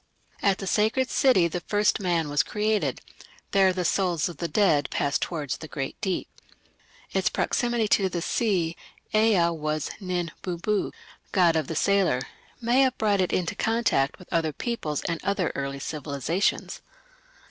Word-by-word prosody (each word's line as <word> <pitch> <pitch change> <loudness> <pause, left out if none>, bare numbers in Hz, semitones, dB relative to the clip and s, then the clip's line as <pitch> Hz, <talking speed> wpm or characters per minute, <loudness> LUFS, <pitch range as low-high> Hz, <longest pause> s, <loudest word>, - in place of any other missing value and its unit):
At 195 -1 +3
the 195 - -6
sacred 220 +7 +1
city 220 -11 +4
the 175 +2 -3
first 210 +4 +1
man 175 -5 0
was 145 +1 +2
created: 210 +4 -1 0.5
there 195 -1 +5
the 180 -1 -2
souls 175 -4 +1
of 175 -4 -8
the 170 - -2
dead 150 -4 +2
passed 140 0 0
towards 150 -6 -3
the 155 - -9
great 135 -3 -4
Deep. 190 -2 -1 0.8
Its - - +1
proximity 240 -3 0
to 195 -2 +3
the 175 - -2
sea 175 -3 0 0.4
Ea 215 -6 +4
was 155 -2 -2
Nin 180 -4 -2
bubu, 185 +3 -1 0.4
"god 175 -3 +4
of 155 -4 0
the 160 - -4
sailor" 190 -7 +2 0.4
may 240 +3 +3
have 260 -1 +2
brought 205 -3 +2
it 185 - 0
into 175 0 0
contact 220 -11 +1
with 180 - -12
other 165 -2 +1
peoples 160 - -3
and 165 -1 -3
other 195 -2 0
early 140 0 -3
civilizations. 150 +6 -2
180 Hz, 160 wpm, -26 LUFS, 160-210 Hz, 0.8 s, there